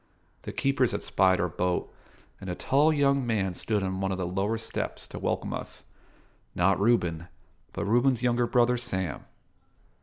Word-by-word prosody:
The - - -6
keepers 135 -3 +1
had - - -3
spied 95 -1 +3
our 90 - +1
boat, 90 +1 -2 0.5
and 95 - -7
a 90 - -2
tall 145 - +3
young 140 -2 +2
man 105 -6 0
stood 105 +3 -1
on 95 0 -2
one 95 0 0
of 95 - -2
the 90 - -2
lower 95 +5 -1
steps 115 - -4
to - - -7
welcome - - -2
us: - - -6 0.7
not 90 +2 +3
Reuben, 90 -7 +1 0.4
but 100 - -4
Reuben's 120 +3 +2
younger 120 -1 +2
brother 125 +1 +3
Sam. 95 -9 -3
105 Hz, 170 wpm, -28 LUFS, 95-120 Hz, 0.7 s, spied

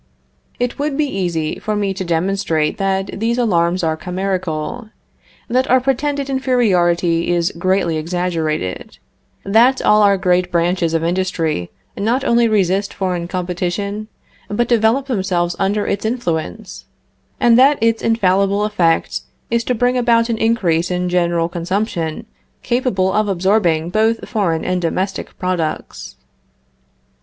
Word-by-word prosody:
It 245 +2 -2
would 290 -1 -1
be 305 - +2
easy 175 - -2
for 215 - -2
me 200 -2 -1
to 190 0 -4
demonstrate 170 0 0
that 195 0 -1
these 230 +2 0
alarms 180 -6 +1
are 160 -1 +1
chimerical; 185 +4 -3 0.6
that 255 +2 0
our 255 +1 +5
pretended 275 +2 -1
inferiority 180 -11 +1
is 175 -1 +1
greatly 175 -2 0
exaggerated; 160 - -3 0.5
that 235 +6 +4
all 210 0 +5
our 200 -1 +4
great 180 -1 +1
branches 170 -1 +1
of 165 - 0
industry 165 - -1 0.3
not 235 +6 0
only 235 -1 +3
resist 195 -2 +1
foreign 180 -3 -2
competition, 185 +4 -3 0.4
but 230 +3 0
develop 235 +3 +2
themselves 185 -8 -1
under 205 +2 0
its 200 - -2
influence, 220 -3 -3 0.5
and 235 -1 +5
that 275 +2 +5
its 230 0 +1
infallible 200 -2 +2
effect 175 -6 +1 0.3
is 235 0 +1
to 250 - 0
bring 245 +2 +1
about 235 -1 +2
an 230 - 0
increase 180 -7 +1
in 180 0 -1
general 170 -2 +1
consumption 170 -1 -3 0.4
capable 220 -7 0
of 215 0 +1
absorbing 180 -4 +1
both 220 +3 +1
foreign 175 -8 -1
and 180 0 -1
domestic 190 +3 -3
products. 180 -4 -3
190 Hz, 130 wpm, -18 LUFS, 175-225 Hz, 0.6 s, our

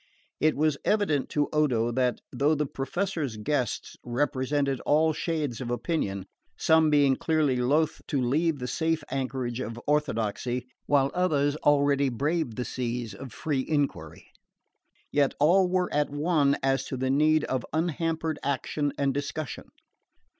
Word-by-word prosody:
It 155 0 +3
was 150 -1 +1
evident 200 -10 +1
to 145 -1 +1
Odo 125 -7 +2
that, 125 0 0
though 150 +3 +2
the 150 0 0
Professor's 145 - -3
guests 125 +3 -2
represented 135 +2 0
all 155 +2 +2
shades 150 -8 -2
of 120 - -4
opinion, 120 - -2 0.3
some 160 -1 +4
being 145 -3 +4
clearly 155 -5 +1
loth 145 +6 +1
to 140 - 0
leave 150 +6 +1
the 125 - -5
safe 160 +3 0
anchorage 130 -2 -2
of 115 -2 -5
orthodoxy, 125 -4 -1 0.2
while 140 -1 +3
others 150 -5 +1
already 140 -2 +3
braved 140 0 -1
the 125 - -3
seas 120 -3 -3
of 130 +4 -9
free 145 -4 -2
enquiry, 145 -3 -2 0.9
yet 140 -2 +2
all 180 +5 +4
were 180 0 0
at 150 0 +1
one 145 -1 +2
as 135 0 +2
to 130 - -4
the 130 +1 0
need 155 +2 +3
of 130 -2 -2
unhampered 160 0 -1
action 140 +1 -1
and 140 -1 +1
discussion. 145 +2 -4
145 Hz, 145 wpm, -27 LUFS, 130-155 Hz, 0.9 s, some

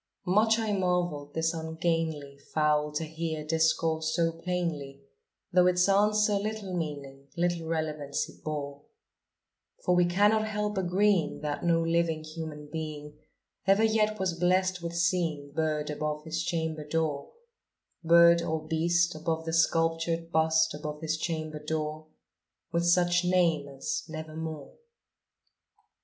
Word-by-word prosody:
Much 215 +4 +4
I 220 -2 -1
marvelled 175 -6 -1
this 160 +1 +1
ungainly 160 -3 -2 0.2
fowl 150 -1 +2
to 150 - -1
hear 160 -1 -4
discourse 160 0 +1
so 165 -1 +2
plainly, 165 -5 -4 0.5
Though 180 0 +5
its 180 0 +3
answer 210 +1 +3
little 210 -3 -4
meaning 140 -4 -5
little 170 -1 0
relevancy 155 -3 -3
bore; 145 -2 -4 1.0
For 180 - +3
we 180 0 +4
cannot 205 +5 +3
help 210 -1 -2
agreeing 190 -2 +1
that 150 -1 -3
no 165 -1 +3
living 165 -1 0
human 155 -1 -7
being 150 -2 -6 0.5
Ever 195 +3 +5
yet 215 -1 +2
was 190 -2 0
blessed 180 +1 +1
with 170 0 -5
seeing 170 -5 0
bird 155 -1 -1
above 150 0 -3
his 160 0 -3
chamber 160 -2 -2
door 150 -2 -2 0.7
Bird 170 +1 +6
or 160 -2 -2
beast 170 +2 +2
above 160 +1 -3
the 165 - -3
sculptured 165 0 +1
bust 160 0 +3
above 150 0 -6
his 160 0 -1
chamber 155 -2 -4
door, 155 0 -3 0.6
With 170 0 0
such 175 0 +3
name 170 -5 +2
as 135 -1 -4
"Nevermore." 155 -1 -6
165 Hz, 130 wpm, -29 LUFS, 155-175 Hz, 1.0 s, Bird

